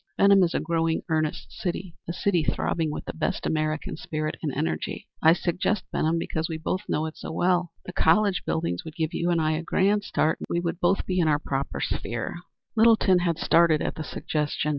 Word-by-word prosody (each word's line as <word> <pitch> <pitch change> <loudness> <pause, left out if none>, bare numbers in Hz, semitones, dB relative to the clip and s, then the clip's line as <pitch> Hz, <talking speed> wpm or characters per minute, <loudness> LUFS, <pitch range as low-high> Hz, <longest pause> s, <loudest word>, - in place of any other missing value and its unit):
Benham 200 -1 +6
is 175 -2 +2
a - - +2
growing, 165 0 0
earnest 155 -1 -1
city 175 -1 -4
a - - -2
city 175 -1 +1
throbbing 160 +1 0
with 150 - -5
the - - -5
best 160 - -2
American 155 +2 -1
spirit 155 -1 -3
and 155 - -1
energy. 80 -9 -3
I 160 +1 +7
suggest 180 +4 0
Benham 160 +2 +1
because 160 0 -2
we 160 - -3
both 175 +4 -2
know 155 - 0
it 160 - -6
so - - -6
well. 175 0 +1
The 185 - -7
college 200 -5 +3
buildings 160 - -2
would 160 0 -9
give 160 -2 -2
you 170 - 0
a 160 -2 +1
grand 200 +5 +2
start, 160 -5 0
and - - -7
I 170 - +1
we 170 - +2
both - - -12 0.2
would - - -5
be 185 -1 0
in 165 - +3
our 150 -1 +4
proper 140 -2 -3
sphere." - - -3 0.4
Littleton 220 -5 +5
had 170 -2 0
started 165 -2 +4
at - - -1
the 160 - -5
suggestion. 150 0 -2
165 Hz, 205 wpm, -26 LUFS, 155-180 Hz, 0.4 s, I